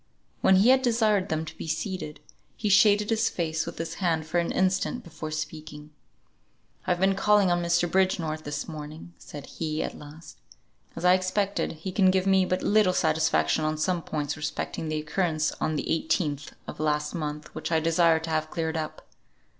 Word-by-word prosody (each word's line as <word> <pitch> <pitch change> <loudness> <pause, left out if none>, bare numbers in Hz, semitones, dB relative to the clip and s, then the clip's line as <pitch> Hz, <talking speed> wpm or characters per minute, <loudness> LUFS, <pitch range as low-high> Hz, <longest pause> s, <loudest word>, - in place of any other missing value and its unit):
When 190 - +5
he 200 +6 +5
had 260 0 +6
desired 220 -6 +2
them 160 0 -1
to - - -9
be - - -7
seated, 160 -3 -4 0.4
he 210 - -1
shaded 205 +2 +5
his 225 -1 +2
face 160 -2 -2
with - - -7
his 165 - -4
hand 165 -3 +1
for 165 +2 0
an 170 - -1
instant 190 +6 0
before 160 -2 -7
speaking. 155 -1 -6 1.0
"I - - -1
have 175 - +1
been 190 +1 +3
calling 200 -1 +3
on 175 0 +1
Mr. 175 0 +2
Bridgenorth 170 -4 0
this 145 0 -4
morning," 155 +1 -8
said 145 -2 -9
he, 155 -1 -3
at - - -5
last; 150 +3 -12 0.6
"as 165 - -4
I 180 - +7
expected, 185 +1 0
he 165 +4 -6
can 190 0 +4
give 185 0 +2
me 190 -1 +4
but 185 0 -1
little 205 -3 +3
satisfaction 155 - +2
on 155 0 0
some 170 +3 0
points 150 -2 -3
respecting 155 +1 -4
the 155 - -1
occurrence 155 0 0
on 155 - 0
the - - -1
18th 155 -3 -1
of - - -8
last 150 -1 0
month 150 -2 -5
which - - -5
I 160 - +3
desire 165 0 +3
to 165 - -6
have 155 0 -1
cleared 160 -1 -2
up. 155 -1 -5
165 Hz, 190 wpm, -27 LUFS, 155-185 Hz, 1.0 s, I